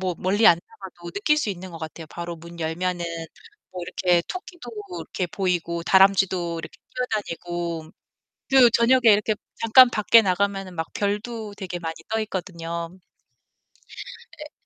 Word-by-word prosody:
뭐 185 Hz, -2 st, -1 dB
멀리 205 Hz, +4 st, +2 dB
안 170 Hz, -6 st, +7 dB
나가도 175 Hz, -3 st, -11 dB
느낄 255 Hz, +9 st, +2 dB
수 295 Hz, -8 st, 0 dB
있는 185 Hz, -1 st, -7 dB
것 165 Hz, -, -9 dB
같아요. 160 Hz, 0 st, -8 dB
바로 170 Hz, +1 st, -6 dB
문 170 Hz, +1 st, -12 dB
열면은 175 Hz, +2 st, -2 dB, 0.7 s
뭐 180 Hz, -1 st, -7 dB
이렇게 175 Hz, 0 st, +1 dB
토끼도 350 Hz, -8 st, -8 dB, 0.3 s
이렇게 175 Hz, +3 st, -3 dB
보이고 175 Hz, -2 st, -2 dB
다람쥐도 190 Hz, -2 st, +3 dB
이렇게 -, -, -9 dB, 0.2 s
뛰어다니고 175 Hz, -8 st, -3 dB, 0.6 s
그 260 Hz, -3 st, +7 dB
저녁에 240 Hz, +3 st, +4 dB
이렇게 210 Hz, +1 st, +2 dB, 0.3 s
잠깐 240 Hz, +2 st, +7 dB
밖에 225 Hz, +1 st, +5 dB
나가면은 195 Hz, -1 st, -1 dB
막 165 Hz, -, -2 dB
별도 210 Hz, +1 st, -3 dB
되게 185 Hz, -3 st, -5 dB
많이 165 Hz, -1 st, -4 dB
떠있거든요. 175 Hz, -5 st, -4 dB, 1.4 s
예. 300 Hz, 0 st, -9 dB
185 Hz, 305 characters per minute, -24 LUFS, 170-215 Hz, 1.4 s, 안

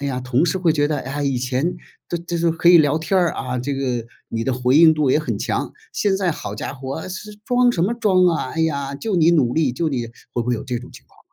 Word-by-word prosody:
哎 140 Hz, -, -3 dB
呀， 130 Hz, -2 st, -2 dB
同 125 Hz, +5 st, +1 dB
事 190 Hz, -, 0 dB
会 170 Hz, -3 st, +2 dB
觉 145 Hz, -2 st, +1 dB
得： 150 Hz, -2 st, -1 dB
“哎 135 Hz, -, -6 dB
呀， 145 Hz, 0 st, -2 dB
以 135 Hz, -2 st, 0 dB
前 130 Hz, +7 st, -1 dB, 0.3 s
都 175 Hz, -, -2 dB
这 170 Hz, 0 st, -4 dB
都 170 Hz, 0 st, +2 dB
可 165 Hz, +1 st, +2 dB
以 175 Hz, -1 st, +9 dB
聊 155 Hz, 0 st, +3 dB
天 185 Hz, +4 st, 0 dB
儿， 175 Hz, -3 st, +2 dB
啊， 125 Hz, -1 st, -4 dB
这 135 Hz, +3 st, -2 dB
个， 125 Hz, -4 st, -2 dB, 0.2 s
你 115 Hz, 0 st, -3 dB
的 130 Hz, -, 0 dB
回 125 Hz, +2 st, +2 dB
应 160 Hz, 0 st, +8 dB
度 150 Hz, -4 st, +1 dB
也 150 Hz, -, +4 dB
很 155 Hz, -, -3 dB
强， -, -, -2 dB, 0.2 s
现 200 Hz, -2 st, +1 dB
在 190 Hz, -2 st, 0 dB
好 100 Hz, -, -6 dB
家 105 Hz, -, -5 dB
伙 135 Hz, +4 st, -6 dB
是 210 Hz, +3 st, -7 dB
装 245 Hz, 0 st, +3 dB
什 175 Hz, -6 st, 0 dB
么 215 Hz, -, 0 dB
装 195 Hz, -6 st, +3 dB
啊， 165 Hz, -7 st, 0 dB
哎 165 Hz, -, -1 dB
呀， 140 Hz, -3 st, -1 dB
就 215 Hz, +8 st, -3 dB
你 165 Hz, -1 st, +5 dB
努 130 Hz, -7 st, +3 dB
力， 150 Hz, -5 st, +1 dB
就 165 Hz, +5 st, -1 dB
你。 125 Hz, -5 st, -2 dB, 0.3 s
“会 120 Hz, -, -1 dB
不 120 Hz, -, -6 dB
会 125 Hz, -, +2 dB
有 115 Hz, -, -6 dB
这 125 Hz, -2 st, -3 dB
种 120 Hz, -, -12 dB
情 -, -, -15 dB
况？ -, -, -28 dB
150 Hz, 300 characters per minute, -21 LUFS, 130-170 Hz, 0.3 s, 以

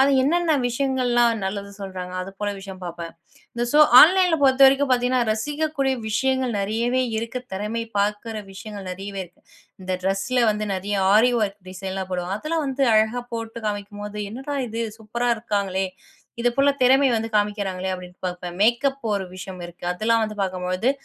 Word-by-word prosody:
அது 275 Hz, +1 st, +5 dB
என்னென்ன 325 Hz, +2 st, +2 dB
விஷயங்கள்லாம் 245 Hz, -2 st, +1 dB
நல்லது 200 Hz, +1 st, -4 dB
சொல்றாங்க. 185 Hz, -2 st, -6 dB
அது 195 Hz, -, -7 dB
போல 205 Hz, 0 st, 0 dB
விஷயம் 190 Hz, -1 st, -10 dB
பாப்பேன். 170 Hz, -1 st, -6 dB, 0.4 s
இந்த 235 Hz, 0 st, -1 dB
சோ 295 Hz, -, +5 dB, 0.2 s
ஆன்லைன்ல 360 Hz, 0 st, +6 dB
பொறுத்தவரைக்கும் 270 Hz, +1 st, +5 dB
பாத்தீங்கன்னா, 250 Hz, 0 st, +2 dB
ரசிக்கக்கூடிய 290 Hz, +2 st, -1 dB, 0.2 s
விஷயங்கள் 260 Hz, 0 st, 0 dB
நெறையவே 235 Hz, +5 st, 0 dB
இருக்கு. 230 Hz, +3 st, -3 dB
தெறமை 215 Hz, +4 st, -3 dB
பாக்கிற 210 Hz, +2 st, -1 dB, 0.2 s
விஷயங்கள் 200 Hz, -1 st, -8 dB
நறையவே 195 Hz, +1 st, -6 dB
இருக்கு. 175 Hz, -, -22 dB, 0.4 s
இந்த 185 Hz, -, -3 dB
ட்ரெஸ்ல 195 Hz, +6 st, 0 dB
வந்து 210 Hz, 0 st, -2 dB
நறைய 200 Hz, +2 st, -2 dB, 0.2 s
ஆரி 245 Hz, +4 st, +5 dB
வொர்க் 205 Hz, -2 st, -2 dB
டிசைன் 190 Hz, +1 st, -6 dB
எல்லாம் 190 Hz, -1 st, -4 dB
போடுவாங்க. 180 Hz, +2 st, -2 dB
அதெல்லாம் 320 Hz, 0 st, -1 dB
வந்து 275 Hz, 0 st, -1 dB
அழகா 220 Hz, +3 st, +2 dB
போட்டு 225 Hz, 0 st, -5 dB
காமிக்கும்போது, 205 Hz, 0 st, -6 dB
என்னடா 270 Hz, +5 st, -5 dB
இது 230 Hz, +1 st, -3 dB, 0.2 s
சூப்பரா 235 Hz, +3 st, -2 dB
இருக்காங்களே! 200 Hz, -4 st, -1 dB, 0.5 s
இது 245 Hz, -, +3 dB
போலத் 280 Hz, 0 st, +3 dB
திறமை 265 Hz, +2 st, +5 dB
வந்து 225 Hz, 0 st, -1 dB
காமிக்கிறாங்களே 200 Hz, -3 st, -1 dB
அப்டின்னுட்டு 180 Hz, 0 st, -9 dB
பாப்பேன். 180 Hz, -1 st, -5 dB
மேக்கப் 265 Hz, +5 st, +2 dB
ஒரு 195 Hz, -2 st, -1 dB
விஷயம் 185 Hz, 0 st, -8 dB
இருக்கு, 175 Hz, 0 st, -11 dB
அதெல்லாம் 225 Hz, +5 st, +1 dB
வந்து 215 Hz, -1 st, -6 dB
பாக்கும்பொழுது 185 Hz, +4 st, -1 dB
215 Hz, 155 wpm, -23 LUFS, 195-255 Hz, 0.5 s, ஆன்லைன்ல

